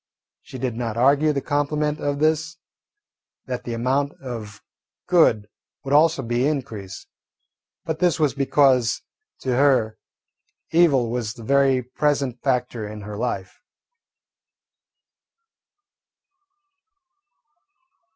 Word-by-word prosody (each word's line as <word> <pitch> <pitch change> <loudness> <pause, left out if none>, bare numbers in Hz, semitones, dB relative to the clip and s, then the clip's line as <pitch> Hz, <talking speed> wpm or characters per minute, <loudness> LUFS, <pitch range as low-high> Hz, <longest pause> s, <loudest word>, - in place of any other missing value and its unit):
She 130 - -10
did 125 -2 -3
not 115 -2 -3
argue 140 +5 +4
the 140 -2 -2
complement 150 +1 0
of 145 0 -2
this, 160 +3 0 0.9
that 125 -1 -5
the 120 - -3
amount 135 +4 0
of 110 -5 -7 0.5
good 155 - +3 0.4
would 135 0 -3
also 155 -1 +4
be 120 +3 0
increased, 110 -10 -5 0.8
but 160 -1 -3
this 175 -2 +2
was 150 -5 +2
because 135 -4 +2 0.4
to 130 -2 -1
her 130 -5 +2 0.7
evil 140 -9 +3
was 115 -3 -3
the 115 - -11
very 135 +1 +3
present 140 0 -1
factor 125 -4 -1
in 105 0 -8
her 105 +1 -7
life. 100 -5 -4
130 Hz, 105 wpm, -23 LUFS, 115-145 Hz, 0.9 s, argue